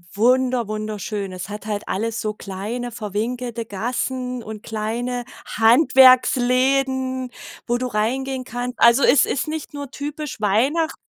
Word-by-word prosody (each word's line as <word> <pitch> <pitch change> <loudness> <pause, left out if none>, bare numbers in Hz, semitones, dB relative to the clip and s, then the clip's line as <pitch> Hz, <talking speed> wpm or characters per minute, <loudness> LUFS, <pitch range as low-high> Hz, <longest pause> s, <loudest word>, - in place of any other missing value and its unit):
Wunder 250 +1 +2
wunderschön. 215 -2 -4
Es 185 +2 -7
hat 210 0 -7
halt 210 -1 -4
alles 225 +3 -2
so 215 -1 -2
kleine 210 +5 -5
verwinkelte 230 +2 -4
Gassen 250 +4 -3
und 215 -1 -8
kleine 235 +3 -3 0.2
Handwerksläden, 260 +1 +4 0.3
wo 240 0 0
du 255 - -2
reingehen 255 +4 -1
kannst. 245 0 -5
Also 235 +3 +6
es 255 -1 +5
ist 275 - -2
nicht 310 -1 -5
nur 285 -1 -6
typisch 295 0 -6
Weihnacht 260 +11 +1
245 Hz, 130 wpm, -21 LUFS, 215-260 Hz, 0.3 s, Also